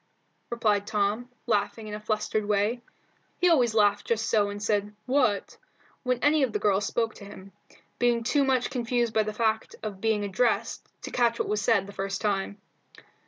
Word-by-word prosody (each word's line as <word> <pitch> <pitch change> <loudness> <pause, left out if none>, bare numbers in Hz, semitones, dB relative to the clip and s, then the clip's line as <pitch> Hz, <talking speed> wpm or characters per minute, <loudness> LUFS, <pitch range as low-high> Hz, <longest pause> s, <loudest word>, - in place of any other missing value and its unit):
replied 210 -4 +1
Tom, 215 +3 0 0.2
laughing 220 0 -1
in 210 - -6
a 210 - -4
flustered 215 0 -1
way. 210 +3 0 0.6
He 360 - +3
always 245 -8 +3
laughed 205 -1 +3
just 225 -1 0
so 205 -2 +2
and 205 0 -6
said 205 0 -1
"what?" 250 -6 +1 0.4
when 250 -1 0
any 300 +1 +4
of 255 -5 +1
the - - +1
girls 200 -1 +1
spoke 230 -2 -1
to 200 - -12
him, 195 -1 -12 0.5
being 240 -1 +2
too 280 +4 +2
much 260 -2 +1
confused 240 -2 0
by 220 - +3
the 215 0 -2
fact 220 0 -1
of 200 -3 -5
being 220 -2 +1
addressed 205 +5 0
to - - -6
catch 235 -2 +2
what - - -1
was 210 0 0
said 200 -2 +2
the 200 - -10
first 195 0 -3
time. 200 -1 -1
215 Hz, 185 wpm, -27 LUFS, 205-240 Hz, 0.6 s, any